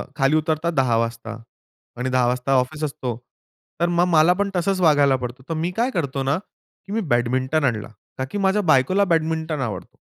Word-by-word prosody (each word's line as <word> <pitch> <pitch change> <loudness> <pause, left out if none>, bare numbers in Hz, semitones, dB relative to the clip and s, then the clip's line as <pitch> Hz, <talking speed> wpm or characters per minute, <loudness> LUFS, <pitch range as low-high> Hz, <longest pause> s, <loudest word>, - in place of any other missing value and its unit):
खाली 135 +2 +2
उतरतात 155 +1 0
10:00 130 -5 +2
वाजता 115 0 -3 0.7
आणि 125 +1 -2
10:00 125 -1 +2
वाजता 125 +2 -1
ऑफिस 150 +5 -4
असतो. 135 -3 -3 0.7
तर 170 - +2
मग 175 - +4
मला 165 +1 +5
पण 200 - 0
तसंच 185 +2 0
वागायला 145 -4 +4
पडतो. 125 +1 -6
तर - - -1
मी 175 - -1
काय 250 +3 +1
करतो 140 - -2
ना, 140 +4 +1 0.5
की 195 - -10
मी 225 - 0
बॅडमिंटन 130 +5 +1
आणला. 115 -3 -1 0.3
ताकी 130 +10 -3
माझ्या 200 +2 +2
बायकोला 185 +10 +3
बॅडमिंटन 160 -2 -1
आवडतो. 105 -7 -4
145 Hz, 180 wpm, -22 LUFS, 130-165 Hz, 0.7 s, मला